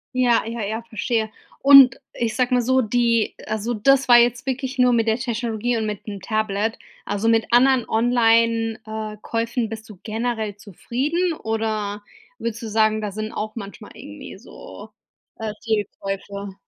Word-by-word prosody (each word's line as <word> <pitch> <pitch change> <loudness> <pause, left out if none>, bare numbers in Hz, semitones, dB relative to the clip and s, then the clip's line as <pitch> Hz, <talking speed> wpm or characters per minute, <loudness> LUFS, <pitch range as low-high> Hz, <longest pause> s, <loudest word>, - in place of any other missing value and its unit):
Ja, 245 -3 +3
ja, 230 0 -5
ja, 220 +3 -3
verstehe. 220 0 -2 0.3
Und 275 -3 +8
ich 225 -2 -2
sage 250 +1 +1
mal 245 - +4
so, 260 +2 +2
die 230 0 +1
also 220 +2 -2
das 270 +5 +3
war 240 - +8
jetzt 245 +2 +2
wirklich 265 0 -3
nur 250 -1 +4
mit 230 -1 +1
der 220 - +2
Technologie 235 -1 -2
und 220 -1 -1
mit 210 -2 -5
'nem 200 -2 -6
Tablet. 215 0 -1 0.3
Also 205 +2 -2
mit 225 -1 +3
anderen 250 0 +4
Online 230 -1 +2
äh, 215 -1 -6
Käufen 230 0 -2
bist 225 0 -8
du 210 - -11
generell 220 -1 -3
zufrieden 275 - -2
oder 215 -4 -3 0.3
würdest 230 0 -4
du 230 - -5
sagen, 215 0 +2
da 210 -2 -3
sind 215 +2 -5
auch 215 0 -5
manchmal 200 -4 -9
irgendwie - - -10
so, - - -12 0.5
äh, 220 -1 -3
Fehlkäufe? 200 -2 -4
225 Hz, 160 wpm, -22 LUFS, 215-245 Hz, 0.5 s, Und